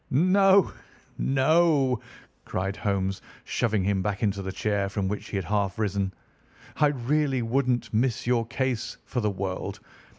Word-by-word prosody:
"No, 190 Hz, +6 st, +5 dB, 0.5 s
no," 135 Hz, -2 st, +3 dB, 0.4 s
cried 95 Hz, +2 st, -2 dB
Holmes, 95 Hz, -2 st, -1 dB, 0.2 s
shoving 110 Hz, -4 st, 0 dB
him 100 Hz, 0 st, +1 dB
back 105 Hz, +2 st, -2 dB
into 100 Hz, -2 st, 0 dB
the 95 Hz, 0 st, -4 dB
chair 100 Hz, -1 st, -1 dB
from 100 Hz, -1 st, -2 dB
which 105 Hz, +2 st, -4 dB
he -, -, -5 dB
had 95 Hz, -3 st, -1 dB
half 100 Hz, -1 st, 0 dB
risen. 100 Hz, -3 st, 0 dB, 0.7 s
"I 150 Hz, -, +5 dB
really 135 Hz, -1 st, 0 dB
wouldn't 125 Hz, +1 st, 0 dB
miss 115 Hz, +2 st, +1 dB
your 120 Hz, -2 st, +1 dB
case 130 Hz, -1 st, -2 dB
for 125 Hz, -, -2 dB
the 105 Hz, -, +1 dB
world. 95 Hz, -1 st, -4 dB
110 Hz, 145 wpm, -26 LUFS, 100-135 Hz, 0.7 s, No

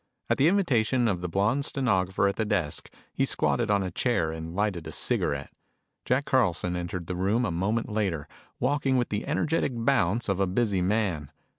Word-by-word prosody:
At -, -, +2 dB
the 140 Hz, -, +5 dB
invitation 130 Hz, -, +2 dB
of 95 Hz, -5 st, -1 dB
the 90 Hz, -, -3 dB
blonde 105 Hz, +10 st, +1 dB
stenographer 100 Hz, -9 st, +1 dB
at 100 Hz, -, -1 dB
the 110 Hz, -, 0 dB
desk, 95 Hz, -8 st, -1 dB, 0.2 s
he -, -, 0 dB
squatted -, -, +1 dB
on 100 Hz, -1 st, +2 dB
a 90 Hz, -, -4 dB
chair 85 Hz, -6 st, 0 dB
and 80 Hz, +1 st, -6 dB
lighted 95 Hz, -5 st, -1 dB
a -, -, -6 dB
cigarette. -, -, -1 dB, 0.5 s
Jack 130 Hz, +3 st, +1 dB
Carlson 90 Hz, -8 st, +1 dB
entered 85 Hz, 0 st, -4 dB
the 90 Hz, -, -4 dB
room 100 Hz, +7 st, +1 dB
a 100 Hz, -, -1 dB
moment 100 Hz, +7 st, -1 dB
later, 100 Hz, -9 st, -2 dB, 0.3 s
walking 135 Hz, 0 st, +1 dB
with 120 Hz, -, 0 dB
the 105 Hz, 0 st, -3 dB
energetic 155 Hz, -4 st, 0 dB
bounce 115 Hz, -3 st, +1 dB
of 100 Hz, -2 st, 0 dB
a 95 Hz, -, +2 dB
busy 100 Hz, 0 st, +1 dB
man. 90 Hz, -7 st, 0 dB
100 Hz, 185 wpm, -27 LUFS, 90-120 Hz, 0.5 s, the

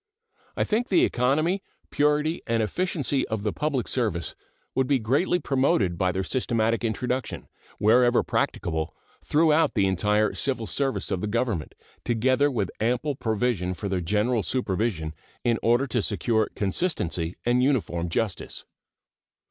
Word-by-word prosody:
I -, -, +2 dB
think 230 Hz, +4 st, 0 dB
the 185 Hz, -, +4 dB
economy, 155 Hz, +10 st, +1 dB, 0.3 s
purity, 150 Hz, +2 st, +1 dB
and 115 Hz, -1 st, +1 dB
efficiency 145 Hz, -, -1 dB
of 110 Hz, -2 st, -3 dB
the 105 Hz, -, -1 dB
public 145 Hz, -5 st, -1 dB
service 105 Hz, -10 st, -1 dB, 0.4 s
would 130 Hz, -1 st, +1 dB
be 140 Hz, -, +3 dB
greatly 135 Hz, -, +1 dB
promoted 130 Hz, -, +1 dB
by 95 Hz, -1 st, +2 dB
their 95 Hz, +1 st, -2 dB
systematic 115 Hz, +1 st, 0 dB
introduction, 125 Hz, +3 st, -2 dB, 0.3 s
wherever 120 Hz, +3 st, +4 dB
practicable, 80 Hz, -2 st, -1 dB, 0.3 s
throughout 160 Hz, +1 st, +3 dB
the 100 Hz, -3 st, +3 dB
entire 105 Hz, +3 st, +2 dB
civil 130 Hz, -5 st, -1 dB
service 135 Hz, +7 st, -1 dB
of 90 Hz, -, -1 dB
the 105 Hz, -, -2 dB
Government, 110 Hz, -7 st, -2 dB, 0.3 s
together 130 Hz, +5 st, +2 dB
with 105 Hz, -9 st, -2 dB
ample 125 Hz, +6 st, 0 dB
provision 110 Hz, -6 st, -1 dB
for 100 Hz, -, -5 dB
their 95 Hz, -2 st, -1 dB
general 105 Hz, +6 st, +1 dB
supervision 95 Hz, -7 st, -1 dB, 0.3 s
in 115 Hz, -2 st, +1 dB
order 120 Hz, +4 st, +3 dB
to 125 Hz, -4 st, -1 dB
secure 110 Hz, +3 st, 0 dB
consistency 95 Hz, -, -1 dB
and 120 Hz, +1 st, +3 dB
uniform 105 Hz, -11 st, 0 dB
justice. 100 Hz, +2 st, -3 dB
115 Hz, 140 wpm, -26 LUFS, 100-135 Hz, 0.4 s, the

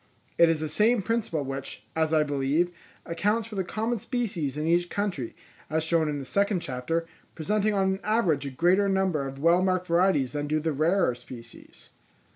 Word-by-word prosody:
It 170 Hz, -, +7 dB
is 160 Hz, -2 st, +1 dB
the 155 Hz, -, -1 dB
same 210 Hz, +8 st, +2 dB
principle 215 Hz, -10 st, -1 dB
which, 135 Hz, -5 st, -6 dB
as 160 Hz, -1 st, +1 dB
I 155 Hz, -1 st, +4 dB
believe, 145 Hz, +4 st, 0 dB, 0.3 s
accounts 205 Hz, +6 st, 0 dB
for 225 Hz, -, -10 dB
the 195 Hz, -2 st, -1 dB
common 220 Hz, +5 st, -2 dB
species 190 Hz, -, -2 dB
in 150 Hz, -, -2 dB
each 175 Hz, +1 st, +2 dB
country, 185 Hz, -, -3 dB, 0.3 s
as 155 Hz, +1 st, 0 dB
shown 160 Hz, -1 st, +2 dB
in 145 Hz, -, -2 dB
the 140 Hz, -, -6 dB
second 200 Hz, +4 st, +1 dB
chapter, 135 Hz, +6 st, -2 dB, 0.3 s
presenting 210 Hz, +6 st, 0 dB
on 190 Hz, -1 st, +2 dB
an 190 Hz, -, -5 dB
average 175 Hz, -11 st, +1 dB
a -, -, -3 dB
greater 180 Hz, +9 st, +2 dB
number 190 Hz, -7 st, +1 dB
of 135 Hz, 0 st, -8 dB
well 170 Hz, +5 st, +4 dB
marked 185 Hz, -1 st, +1 dB
varieties 170 Hz, -6 st, +2 dB
than 145 Hz, 0 st, -3 dB
do 155 Hz, +1 st, +1 dB
the 160 Hz, 0 st, -1 dB
rarer 160 Hz, 0 st, +2 dB
species. 120 Hz, -1 st, -12 dB
165 Hz, 190 wpm, -27 LUFS, 145-195 Hz, 0.3 s, It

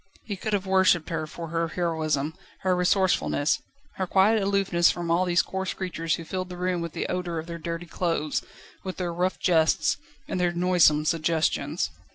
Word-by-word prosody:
He 205 Hz, -, -4 dB
could 215 Hz, +3 st, -4 dB
have 200 Hz, -1 st, 0 dB
worshipped 190 Hz, -3 st, +3 dB
her 160 Hz, -2 st, -2 dB
for 165 Hz, +1 st, -7 dB
her 165 Hz, 0 st, 0 dB
heroism, 160 Hz, -3 st, -1 dB, 0.3 s
her 185 Hz, -1 st, +2 dB
resourcefulness, 180 Hz, -4 st, +2 dB, 0.4 s
her 190 Hz, -, -1 dB
quiet 205 Hz, +4 st, +4 dB
aloofness 195 Hz, -3 st, +3 dB
from 170 Hz, -1 st, -2 dB
all 175 Hz, +2 st, +3 dB
these 175 Hz, 0 st, +3 dB
coarse 190 Hz, 0 st, -3 dB
creatures 165 Hz, -4 st, -2 dB
who 165 Hz, -, -8 dB
filled 185 Hz, +1 st, -4 dB
the 180 Hz, -, -7 dB
room 180 Hz, -1 st, -1 dB
with 170 Hz, -1 st, -5 dB
the -, -, -2 dB
odour 180 Hz, -2 st, -2 dB
of 160 Hz, -, -4 dB
their 170 Hz, 0 st, -6 dB
dirty 170 Hz, +1 st, -4 dB
clothes, 165 Hz, -4 st, -1 dB, 0.4 s
with 185 Hz, -1 st, -5 dB
their 175 Hz, -2 st, -2 dB
rough 180 Hz, +2 st, 0 dB
jests, 160 Hz, -3 st, +2 dB, 0.3 s
and -, -, -2 dB
their 175 Hz, -1 st, +1 dB
noisome 175 Hz, -4 st, +4 dB
suggestions. 160 Hz, 0 st, 0 dB
175 Hz, 185 wpm, -26 LUFS, 165-185 Hz, 0.4 s, quiet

